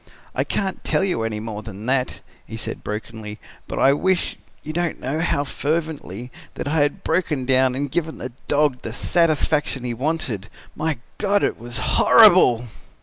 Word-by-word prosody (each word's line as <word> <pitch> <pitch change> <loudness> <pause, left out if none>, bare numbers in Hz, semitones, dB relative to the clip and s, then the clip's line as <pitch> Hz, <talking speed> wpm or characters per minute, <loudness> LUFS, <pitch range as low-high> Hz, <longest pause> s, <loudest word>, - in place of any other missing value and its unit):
I - - +1
can't 195 -2 -2
tell - - +1
you 185 -11 0
any 110 -1 -2
more 110 -1 -5
about 105 -1 -8
that," 130 0 0 0.3
he 110 - -6
said 110 - -5
brokenly, 105 0 -6 0.3
"but - - -5
I 135 - +5
wish, 185 +5 +1 0.3
you 155 - -5
don't 175 0 -1
know 135 +5 -2
how 160 -4 +1
fervently, 145 - -3 0.2
that - - -4
I 155 +3 0
had 145 -1 +1
broken 160 -6 0
down 130 -1 +3
and 140 0 -2
given 160 0 -2
the 125 - -6 0.2
dog 145 -3 +2
the 115 - -6
satisfaction 155 -4 +1
he 120 -1 -2
wanted. 125 - -2 0.3
My 155 -2 -1 0.2
God! 205 0 +2
It - - 0
was 120 +1 -6
horrible! 120 0 +6
135 Hz, 170 wpm, -22 LUFS, 115-160 Hz, 0.3 s, horrible